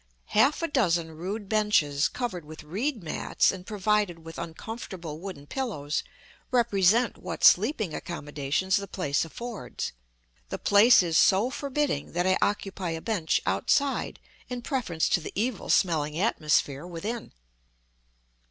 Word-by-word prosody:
Half 270 +9 +4
a - - +2
dozen 175 - +1
rude 195 +6 -5
benches 190 -8 +2
covered 225 -9 -4
with 155 +1 -11
reed 215 - -2
mats 155 - +1
and 185 -1 -9
provided 205 -5 0
with 165 0 -8
uncomfortable 170 -2 -7
wooden 180 -6 -8
pillows 155 - -3 0.5
represent 230 -2 +3
what - - -6
sleeping 215 - +4
accommodations 150 +3 -1
the 200 0 -4
place 150 -6 -1
affords. 215 - -6 0.6
The - - -3
place 210 +1 +6
is 165 -2 +2
so 210 +6 +4
forbidding 280 - -2
that 175 +1 0
I 185 0 +4
occupy 195 -3 -1
a - - -6
bench 180 -4 0
outside 280 -1 +1 0.3
in 245 -1 -5
preference 225 - -1
to - - +3
the - - -7
evil 225 +2 -2
smelling 155 -4 +2
atmosphere 150 -5 +1
within. 205 +7 -5
190 Hz, 135 wpm, -27 LUFS, 160-225 Hz, 0.6 s, place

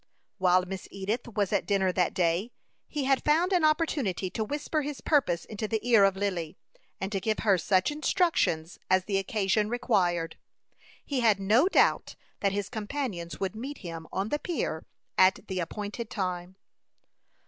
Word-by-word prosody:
While 185 0 +4
Miss 190 0 -6
Edith 205 +6 -3
was 205 -4 -1
at - - +1
dinner 195 -2 +2
that 180 -1 0
day, 175 +5 +1 0.4
he 295 -2 -3
had 270 0 +2
found 335 +6 +3
an 355 -3 +3
opportunity 290 - +1
to 220 - -2
whisper 295 +6 -2
his 290 -1 -5
purpose 220 - +1
into 215 0 -4
the 220 0 0
ear 225 -5 +6
of 195 -1 +2
Lily, 185 -5 -3 0.4
and 190 +1 -3
to 195 - 0
give 215 +2 -1
her 205 -3 +4
such 185 - +2
instructions 295 - 0
as 185 0 +3
the 195 -2 +1
occasion 205 +1 0
required. 185 -9 0 0.7
He 280 -3 -1
had 220 -4 +4
no 220 - +4
doubt - - +2 0.2
that 200 - +1
his 200 0 -2
companions 215 -6 -4
would 195 0 -2
meet 270 +6 -6
him 165 -1 -6
on 195 +3 -2
the 295 - 0
pier 295 - -3 0.3
at 185 +2 +5
the 190 -1 -3
appointed 210 +6 -4
time. 180 -2 -3
205 Hz, 170 wpm, -28 LUFS, 185-250 Hz, 0.7 s, ear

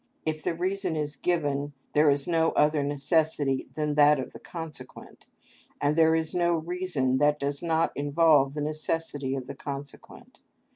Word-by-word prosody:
If 155 -1 -2
the 165 - -2
reason 185 0 -2
is 150 -1 -3
given 145 -3 -1 0.2
there 150 0 +5
is 140 0 0
no 165 -1 +2
other 150 0 +3
necessity 145 -1 0
than 150 -1 -1
that 145 -1 +5
of 130 - -6
the - - -10
consequent, 160 -6 -10 0.5
and 145 +1 +1
there 160 0 +4
is 160 -1 -1
no 175 -1 +2
reason 160 -6 -1
that 150 0 +3
does 140 0 -2
not 165 -1 +1
involve 145 -1 +3
the 150 - -3
necessity 150 -2 -2
of 130 -2 -5
the - - -7
consequent. 140 0 -9
150 Hz, 160 wpm, -27 LUFS, 145-165 Hz, 0.5 s, there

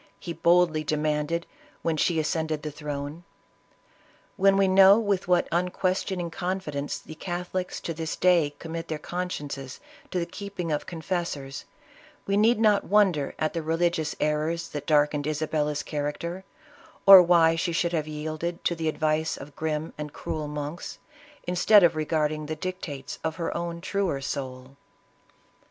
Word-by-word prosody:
he 170 - -5
boldly 170 -1 +3
demanded, 150 +2 -1 0.4
when 165 -1 +1
she 160 +2 +1
ascended 155 0 -1
the 150 - -4
throne. 145 +2 -6 1.1
"When 195 0 +4
we 195 -1 +4
know 190 +1 +7
with 200 -5 0
what 180 -1 +3
unquestioning 180 0 -1
confidence 165 -5 -3
the - - -11
Catholics, 180 +2 -4
to 165 - -3
this 160 0 -4
day, 170 -5 +3
commit 165 0 -6
their 155 - -3
consciences 145 -6 -5 0.3
to - - -3
the 170 - 0
keeping 185 -2 -5
of 150 - -2
confessors, 165 -5 -4 0.6
we 200 - 0
need 220 +3 +4
not 210 -2 +4
wonder 190 -9 +2
at 155 - -1
the 165 - -2
religious 165 -1 0
errors 155 +2 -1
that 145 -1 -6
darkened 150 -1 +2
Isabella's 150 -1 -1
character, 160 +5 -4 0.6
or 195 -2 +12
why 170 -2 +5
she 165 +1 -1
should 170 +1 0
have 155 -2 -1
yielded 155 +3 -4
to - - +1
the 160 -1 -1
advice 155 +1 0
of 140 +1 -11
grim, 155 0 -3
and 150 -1 -5
cruel 155 -1 -4
monks, 150 +3 -5 0.5
instead 180 +3 +5
of 170 -1 +4
regarding 155 -1 -1
the 155 - -3
dictates 155 -5 -6
of 160 0 -2
her 165 -1 -3
own 170 0 -4
truer 190 -6 -1
soul. 130 -1 -6
165 Hz, 150 wpm, -26 LUFS, 150-180 Hz, 1.1 s, or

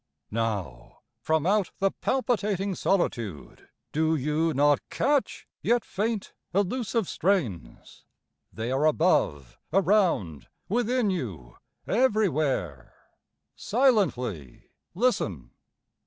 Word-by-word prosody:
Now, 105 - -4 0.2
From 160 -1 +1
out 200 0 +2
the 195 0 +1
palpitating 210 -7 -1
solitude 115 - -2 0.2
Do 160 +1 +1
you 150 +3 0
not 145 0 +3
catch, 285 -1 0
yet 240 -2 +1
faint, 215 +1 -3 0.2
elusive 205 +1 0
strains? 120 - -2 0.5
They 115 +2 -4
are 140 +4 +2
above, 145 - +1
around, 175 - +2 0.2
within 240 0 +1
you, 95 - -5 0.3
everywhere. 155 - 0 0.6
Silently 140 - 0 0.2
listen! 100 - 0
165 Hz, 85 wpm, -27 LUFS, -, 0.6 s, not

